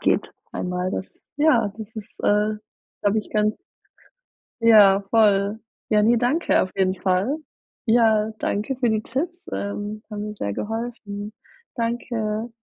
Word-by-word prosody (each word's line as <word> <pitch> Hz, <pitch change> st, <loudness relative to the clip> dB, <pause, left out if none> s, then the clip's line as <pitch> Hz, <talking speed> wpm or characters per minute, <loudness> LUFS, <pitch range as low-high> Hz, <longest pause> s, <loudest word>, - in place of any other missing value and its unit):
geht -, -, +1 dB, 0.2 s
einmal. 180 Hz, 0 st, -2 dB
Das 190 Hz, -, -3 dB, 0.3 s
ja 245 Hz, -9 st, +3 dB
das 220 Hz, 0 st, -8 dB
ist, 215 Hz, 0 st, -8 dB
äh, 210 Hz, +1 st, +3 dB, 0.5 s
glaube 205 Hz, +2 st, +2 dB
ich, 210 Hz, -, -5 dB
ganz 215 Hz, 0 st, +1 dB, 1.0 s
Ja 205 Hz, -4 st, +7 dB
voll. 205 Hz, -1 st, +3 dB, 0.3 s
Ja, 210 Hz, -1 st, +4 dB
ne, 235 Hz, +3 st, +4 dB
danke 250 Hz, +8 st, +2 dB
auf 185 Hz, -, -3 dB
jeden 190 Hz, -1 st, +2 dB
Fall. 190 Hz, +10 st, +1 dB, 0.5 s
Ja, 220 Hz, -2 st, +4 dB
danke 215 Hz, +6 st, -1 dB
für 245 Hz, -1 st, +1 dB
die 220 Hz, -1 st, +1 dB
Tipps, 295 Hz, +10 st, -2 dB, 0.2 s
ähm, 205 Hz, +1 st, -4 dB
haben 210 Hz, 0 st, -4 dB
mir 210 Hz, -, -6 dB
sehr 100 Hz, -, -2 dB
geholfen. 210 Hz, -, -5 dB, 0.4 s
Danke. 230 Hz, -1 st, -2 dB
215 Hz, 140 wpm, -23 LUFS, 205-230 Hz, 1.0 s, Ja